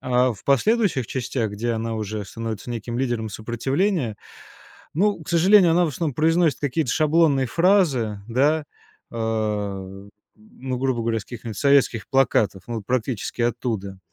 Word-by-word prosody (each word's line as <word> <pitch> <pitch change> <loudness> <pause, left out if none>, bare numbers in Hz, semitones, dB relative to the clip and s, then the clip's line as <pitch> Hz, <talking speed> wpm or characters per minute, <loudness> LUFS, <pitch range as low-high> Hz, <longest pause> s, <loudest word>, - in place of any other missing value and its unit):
А 125 0 +2
в 100 - -15
последующих 150 - +2
частях, 120 -3 -2
где 115 +3 -2
она 115 0 -3
уже 105 -1 -4
становится 115 +2 -6
неким 120 +1 -4
лидером 120 -4 -1
сопротивления, 120 - -1 0.8
ну, 195 +1 +1
к - - -11
сожалению, 175 +1 +5
она 175 +1 +3
в - - -1
основном 150 0 -3
произносит 160 0 +2
какие-то 145 -2 -1
шаблонные 155 -3 +3
фразы. 150 - +2
Да? 145 +6 +2 0.5
Э, 105 -4 -3 0.3
ну, 125 +4 -6
грубо 130 -2 0
говоря, 115 -1 0
с - - -9
каких-нибудь 115 -3 -8
советских 140 -4 +2
плакатов, 110 -8 +2
ну 120 - -4
вот 105 -3 -6
практически 120 -2 -2
оттуда. 115 -5 -2
120 Hz, 145 wpm, -23 LUFS, 110-150 Hz, 0.8 s, сожалению